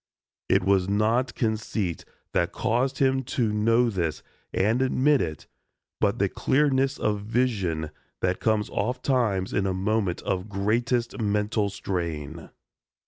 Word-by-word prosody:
It -, -, +3 dB
was 95 Hz, -1 st, +2 dB
not 115 Hz, +4 st, +1 dB
conceit 110 Hz, -5 st, -2 dB, 0.3 s
that -, -, +1 dB
caused 130 Hz, +4 st, 0 dB
him 130 Hz, -1 st, +2 dB, 0.2 s
to 110 Hz, -4 st, +2 dB
know 115 Hz, +3 st, +3 dB
this 85 Hz, -6 st, -2 dB, 0.3 s
and 110 Hz, +6 st, +1 dB
admit 135 Hz, +2 st, +3 dB
it 80 Hz, -3 st, -4 dB, 0.5 s
but -, -, +2 dB
the -, -, +2 dB
clearness 135 Hz, -1 st, +1 dB
of 105 Hz, -1 st, 0 dB
vision 100 Hz, -9 st, -1 dB, 0.3 s
that 90 Hz, 0 st, 0 dB
comes 110 Hz, -2 st, +1 dB
oft 125 Hz, +5 st, -2 dB
times 110 Hz, -8 st, +1 dB
in 100 Hz, -, +1 dB
a 95 Hz, -, -1 dB
moment 100 Hz, -1 st, 0 dB
of 95 Hz, +2 st, -2 dB
greatest 115 Hz, +5 st, 0 dB
mental 105 Hz, 0 st, 0 dB
strain. 85 Hz, -7 st, -4 dB
105 Hz, 135 wpm, -26 LUFS, 95-120 Hz, 0.5 s, It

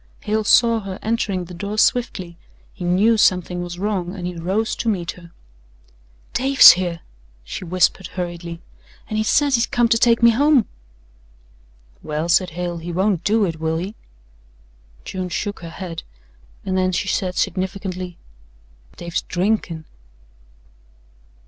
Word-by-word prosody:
Hale 215 Hz, +1 st, -1 dB
saw 230 Hz, +2 st, +4 dB
her 195 Hz, -3 st, -6 dB
entering 205 Hz, -5 st, -1 dB
the 180 Hz, -, -11 dB
door 200 Hz, +4 st, -5 dB
swiftly, 205 Hz, -8 st, +1 dB, 0.4 s
he -, -, -9 dB
knew 200 Hz, +6 st, +3 dB
something 180 Hz, -3 st, +2 dB
was 175 Hz, 0 st, -6 dB
wrong 190 Hz, -2 st, -2 dB
and 180 Hz, -3 st, -6 dB
he 180 Hz, -, -3 dB
rose 190 Hz, +7 st, -1 dB
to 230 Hz, -, -1 dB
meet 180 Hz, -6 st, -1 dB
her. 170 Hz, -1 st, -14 dB, 1.0 s
"Dave's 270 Hz, +1 st, +8 dB
here," 175 Hz, -2 st, -2 dB, 0.4 s
she -, -, -7 dB
whispered 185 Hz, +1 st, +1 dB
hurriedly, 175 Hz, -2 st, -6 dB, 0.5 s
"an' 215 Hz, -, -1 dB
he -, -, +2 dB
says 285 Hz, +6 st, +2 dB
he's 235 Hz, -2 st, +3 dB
come 240 Hz, -3 st, +2 dB
to 230 Hz, -1 st, +3 dB
take 235 Hz, -1 st, +3 dB
me 235 Hz, -, +8 dB
home." 275 Hz, 0 st, +4 dB, 1.4 s
"Well," 155 Hz, +2 st, -3 dB
said 180 Hz, +1 st, +3 dB
Hale, 175 Hz, -1 st, -3 dB
"he 170 Hz, +2 st, -6 dB
won't 185 Hz, 0 st, 0 dB
do 215 Hz, 0 st, +2 dB
it, 165 Hz, -3 st, -4 dB
will 160 Hz, 0 st, -1 dB
he?" 185 Hz, +5 st, -4 dB, 1.1 s
June 185 Hz, -1 st, -4 dB
shook 205 Hz, +4 st, -3 dB
her 170 Hz, -, -8 dB
head 165 Hz, -1 st, -7 dB, 0.6 s
and 190 Hz, -1 st, -1 dB
then 185 Hz, 0 st, +1 dB
she 185 Hz, -, -2 dB
said 185 Hz, -1 st, -1 dB
significantly: 185 Hz, -1 st, -3 dB, 0.8 s
"Dave's 170 Hz, 0 st, -3 dB
drinkin'." 180 Hz, -4 st, -1 dB
185 Hz, 145 wpm, -21 LUFS, 175-215 Hz, 1.4 s, Dave's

